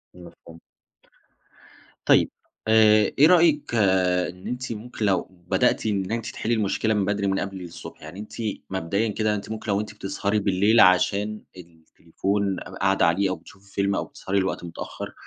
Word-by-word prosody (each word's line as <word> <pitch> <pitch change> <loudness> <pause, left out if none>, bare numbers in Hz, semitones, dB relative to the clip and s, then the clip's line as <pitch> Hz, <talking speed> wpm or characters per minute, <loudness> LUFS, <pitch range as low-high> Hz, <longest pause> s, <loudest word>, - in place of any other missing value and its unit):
مفهوم. 85 -1 -14 1.4
طيب، - - +5 0.4
آآ 110 -1 +5
إيه 150 - +8
رأيِك 160 -6 +3 0.5
إن 90 +1 -11
أنتِ 125 +1 -4
ممكن 110 0 -5
لو 95 -3 +2 0.2
بدأتِ - - +1
إن 100 -2 -1
أنتِ 115 -1 -2
تحلّي 115 - -2
المشكلة 110 0 0
من 100 -2 +1
بدري 100 0 -1
من 95 0 0
قبل 95 -1 -5
الصبح، 85 -1 -10
يعني 80 +5 -10
أنتِ 105 - -9 0.4
مبدئيًا 95 +4 -1
كده 105 0 0
أنتِ 100 +1 -7
ممكن 110 -1 -4
لو 100 - +1
أنتِ 105 - -8
بتسهري 105 +1 -2
بالليل 100 +3 +3
عشان 100 +3 +3 0.2
التليفون 90 +3 -4
ق - - -8 0.2
قاعدة 95 0 +3
عليه 95 +4 +2
أو 95 - -1
بتشوفي 100 +1 -18
فيلم 100 0 0
أو - - -1
بتسهري 100 +1 -2
لوقت 95 -2 -2
متأخر، 85 -1 -7
100 Hz, 160 wpm, -24 LUFS, 95-110 Hz, 1.4 s, إيه